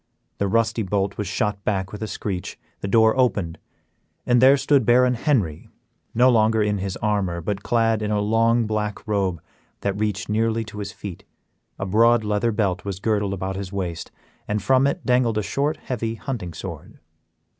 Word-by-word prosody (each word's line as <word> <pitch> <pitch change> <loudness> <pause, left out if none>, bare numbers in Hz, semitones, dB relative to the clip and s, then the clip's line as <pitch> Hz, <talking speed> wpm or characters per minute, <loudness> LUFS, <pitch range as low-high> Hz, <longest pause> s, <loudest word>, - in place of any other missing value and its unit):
The 100 - +1
rusty 115 +2 +1
bolt 100 0 -1
was 105 - -2
shot 100 +1 -2
back 95 -2 -1
with 105 - -8
a 110 - -2
screech, 95 -3 -4 0.2
the - - -4
door 110 +2 +4
opened, 105 -10 0 0.7
and 120 0 +3
there 135 +2 +7
stood 140 -1 +3
Baron 125 +2 +4
Henry, 115 - 0 0.5
no 125 +3 +5
longer 110 -1 +3
in 105 -1 0
his 95 0 -3
armor, 100 -5 0
but 100 +4 -3
clad 115 0 +1
in 105 - -2
a 105 -1 +1
long 115 +3 +2
black 105 0 -3
robe 95 -6 -1 0.4
that 100 -1 -1
reached 105 -2 -2
nearly 115 +1 0
to 105 -1 -9
his 100 0 -4
feet, 100 -5 -8 0.5
a 100 - -3
broad 115 +4 +4
leather 105 +2 0
belt 100 -4 -1
was 100 -2 -4
girdled 105 -2 0
about 95 0 -4
his 95 -1 -5
waist, 90 -5 -4 0.4
and 105 -1 -1
from 135 +2 +4
it 175 +5 -3
dangled 125 -3 +2
a 105 - 0
short, 140 +9 -1
heavy 115 -2 -3
hunting 110 - -5
sword. - - -8
105 Hz, 180 wpm, -23 LUFS, 100-115 Hz, 0.7 s, there